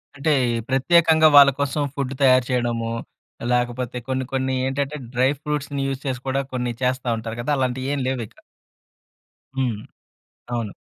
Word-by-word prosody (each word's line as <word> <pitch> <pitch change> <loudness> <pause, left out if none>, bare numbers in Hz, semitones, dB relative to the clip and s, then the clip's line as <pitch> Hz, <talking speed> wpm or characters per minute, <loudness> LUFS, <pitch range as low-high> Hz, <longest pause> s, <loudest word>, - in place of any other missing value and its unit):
అంటే 145 +2 0 0.4
ప్రత్యేకంగా 160 +4 +5
వాళ్ళ 140 -1 +10
కోసం 140 +1 0
ఫుడ్ 135 -2 -2
తయారు 130 -2 +5
చేయడము, 120 -2 -1 0.6
లేకపోతే 125 0 -1
కొన్ని 130 0 -1
కొన్ని 130 0 0
ఏంటంటే 140 +2 -2 0.2
డ్రై 125 +2 +3
ఫ్రూట్స్‌ని 145 -1 -3
యూజ్ 135 -1 -3
చేసి 130 -3 -2
కూడా 135 +1 +1
కొన్ని 125 -1 -1
చేస్తా 130 0 0
ఉంటారు 115 +1 -6
గదా! 145 +5 0
అలాంటివి 130 0 -1
ఏం 145 - -1
లేవిక. 120 -5 -5 1.2
హ్మ్. 125 -6 -1 0.7
అవును. 115 -4 -3
130 Hz, 140 wpm, -22 LUFS, 125-140 Hz, 1.2 s, వాళ్ళ